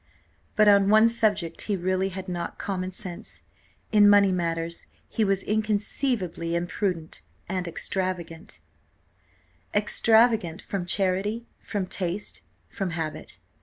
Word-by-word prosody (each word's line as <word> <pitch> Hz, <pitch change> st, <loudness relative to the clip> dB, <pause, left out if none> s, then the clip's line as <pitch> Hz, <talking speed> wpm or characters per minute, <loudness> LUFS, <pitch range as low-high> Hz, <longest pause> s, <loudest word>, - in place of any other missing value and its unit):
But 215 Hz, -1 st, +5 dB
on 200 Hz, -1 st, +6 dB
one 215 Hz, +2 st, +7 dB
subject 210 Hz, -8 st, +1 dB
he 205 Hz, -, +2 dB
really 185 Hz, +1 st, 0 dB
had 190 Hz, 0 st, -6 dB
not 175 Hz, -1 st, -4 dB
common 185 Hz, -2 st, -3 dB
sense; 185 Hz, +2 st, -4 dB, 0.5 s
in 205 Hz, -2 st, +7 dB
money 200 Hz, -1 st, +6 dB
matters 170 Hz, -2 st, -2 dB, 0.2 s
he 225 Hz, -, 0 dB
was 195 Hz, -2 st, +1 dB
inconceivably 210 Hz, -, -1 dB
imprudent 170 Hz, -, -2 dB, 0.3 s
and 185 Hz, -2 st, -2 dB
extravagant; 170 Hz, -1 st, -4 dB, 1.2 s
extravagant 220 Hz, -3 st, +3 dB
from 190 Hz, -4 st, -4 dB
charity, 195 Hz, +5 st, 0 dB, 0.2 s
from 205 Hz, -3 st, -3 dB
taste, 185 Hz, +2 st, -3 dB, 0.3 s
from 195 Hz, -4 st, -3 dB
habit. 155 Hz, -2 st, -4 dB
190 Hz, 115 wpm, -26 LUFS, 175-210 Hz, 1.2 s, one